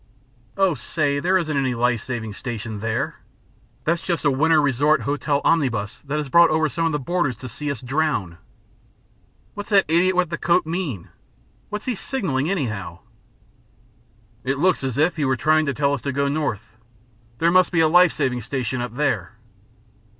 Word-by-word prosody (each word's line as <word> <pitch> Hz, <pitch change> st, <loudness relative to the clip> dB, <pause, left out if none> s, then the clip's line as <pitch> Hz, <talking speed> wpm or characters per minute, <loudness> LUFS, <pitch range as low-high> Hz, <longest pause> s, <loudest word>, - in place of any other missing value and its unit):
"Oh, 190 Hz, -3 st, +3 dB
say, 140 Hz, +2 st, -1 dB
there 185 Hz, +5 st, +2 dB
isn't 155 Hz, -4 st, -2 dB
any 130 Hz, -3 st, 0 dB
life 120 Hz, -1 st, +1 dB
saving 115 Hz, -4 st, -5 dB
station 115 Hz, -1 st, -6 dB
there. 110 Hz, +1 st, -2 dB, 0.6 s
That's 170 Hz, +1 st, 0 dB
just 170 Hz, -3 st, -2 dB
a 145 Hz, -, +4 dB
winter 155 Hz, +4 st, +3 dB
resort 145 Hz, +2 st, +2 dB
hotel 145 Hz, 0 st, -1 dB
omnibus 120 Hz, -11 st, 0 dB
that 145 Hz, +2 st, -1 dB
has 150 Hz, -2 st, -2 dB
brought 170 Hz, +5 st, +6 dB
over 155 Hz, 0 st, +2 dB
some 165 Hz, +3 st, -1 dB
of -, -, -1 dB
the 150 Hz, -, 0 dB
boarders 145 Hz, -, -1 dB
to 130 Hz, -, -8 dB
see 135 Hz, +5 st, -5 dB
us 140 Hz, -5 st, -4 dB
drown." 130 Hz, -, -1 dB, 1.1 s
"What's 205 Hz, +1 st, -7 dB
that 200 Hz, -2 st, +4 dB
idiot 175 Hz, +4 st, +3 dB
with 180 Hz, -2 st, +1 dB
the 165 Hz, -, -3 dB
coat 175 Hz, 0 st, +2 dB
mean? 160 Hz, -, -4 dB, 0.6 s
What's 210 Hz, 0 st, -5 dB
he 255 Hz, -, 0 dB
signaling, 180 Hz, -, -2 dB
anyhow?" 105 Hz, -, -3 dB, 1.4 s
"It 135 Hz, +2 st, -1 dB
looks 180 Hz, 0 st, +2 dB
as 130 Hz, -2 st, -2 dB
if 160 Hz, +4 st, +2 dB
he 150 Hz, -, 0 dB
were 130 Hz, -1 st, +1 dB
trying 155 Hz, +4 st, +2 dB
to 140 Hz, -, 0 dB
tell 140 Hz, -1 st, +1 dB
us 140 Hz, -, -2 dB
to 140 Hz, -, -2 dB
go 140 Hz, +1 st, 0 dB
north. 120 Hz, -8 st, -3 dB, 0.6 s
There 170 Hz, +5 st, +2 dB
must 185 Hz, 0 st, +4 dB
be 170 Hz, -3 st, +3 dB
a 160 Hz, -, +5 dB
life 175 Hz, +1 st, +6 dB
saving 130 Hz, -4 st, -1 dB
station 130 Hz, -2 st, -3 dB
up 120 Hz, -1 st, -5 dB
there." 110 Hz, -, -1 dB
145 Hz, 180 wpm, -22 LUFS, 125-165 Hz, 1.4 s, brought